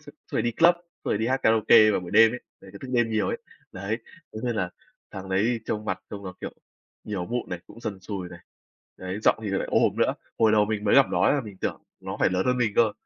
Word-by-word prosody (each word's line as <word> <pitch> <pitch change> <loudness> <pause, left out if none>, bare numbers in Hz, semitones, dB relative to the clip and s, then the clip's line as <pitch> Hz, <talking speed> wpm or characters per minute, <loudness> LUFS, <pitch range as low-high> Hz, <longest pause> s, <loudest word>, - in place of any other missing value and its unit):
suốt - - -14 0.2
suốt - - -2
ngày - - +2
đi 120 -1 0
club, 170 +6 +5
xong 175 0 -25 0.2
rồi 105 - 0
đi 110 - -1
hát 130 +2 0
karaoke 110 0 +6
vào 100 - +1
buổi 90 -1 -8
đêm 110 +2 +6
ấy. 125 - -5 0.2
Đấy 95 - -14
cứ 100 - -10
thức 130 - -9
đêm 120 -2 +2
nhiều 110 -1 0
ấy. - - -2 0.3
Đấy, 100 +5 -3 0.3
thế - - -6
nên 120 -2 -1
là 90 -3 -1 0.4
thằng 95 0 -8
đấy 110 +5 +1
trông 105 0 -3
mặt 95 -2 -3
trông 100 -1 -7
nó, 90 0 -7
kiểu, - - -5 0.5
nhiều 95 -4 -4
mụn 120 +3 -3
này, 90 - -3
cũng 115 - -14
sần 105 -5 -5
sùi 95 -2 -5
này. 85 -1 -12 0.6
Đấy, 95 +2 -5
giọng - - +4
thì 105 - -3
lại 95 - -2
ồm - - +2
nữa. - - +2 0.2
Hồi 110 -1 +4
đầu 105 -1 +5
mình 105 0 -3
mới 100 - +3
gặp 140 -1 +7
nó - - +1
ấy - - +4
là 140 - +1
mình 105 -5 -10
tưởng - - -3 0.2
nó - - -6
phải - - +4
lớn 95 +4 0
hơn 125 0 +2
mình 110 -4 +1
cơ. 110 -3 +4
105 Hz, 275 wpm, -26 LUFS, 95-115 Hz, 0.6 s, gặp